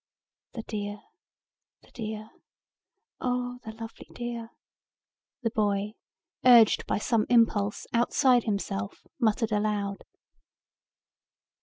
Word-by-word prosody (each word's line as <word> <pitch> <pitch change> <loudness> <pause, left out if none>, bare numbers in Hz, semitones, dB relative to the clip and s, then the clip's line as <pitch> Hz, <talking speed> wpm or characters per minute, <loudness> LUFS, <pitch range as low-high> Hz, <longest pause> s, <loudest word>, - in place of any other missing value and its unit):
"The 225 - -5
dear, 205 -1 -4 0.8
the - - -22
dear, 215 -1 -6 0.9
oh 245 0 -2
the 220 - -6
lovely 225 0 -9
dear," 235 -1 -5 0.9
the 230 - +1
boy, 205 -2 0 0.5
urged 240 -4 +7
by - - +1
some 215 +1 +1
impulse 220 -4 +3
outside 245 +1 +3
himself, 195 - -3
muttered 225 -1 +1
aloud. 205 -1 -1
220 Hz, 95 wpm, -28 LUFS, 210-240 Hz, 0.9 s, urged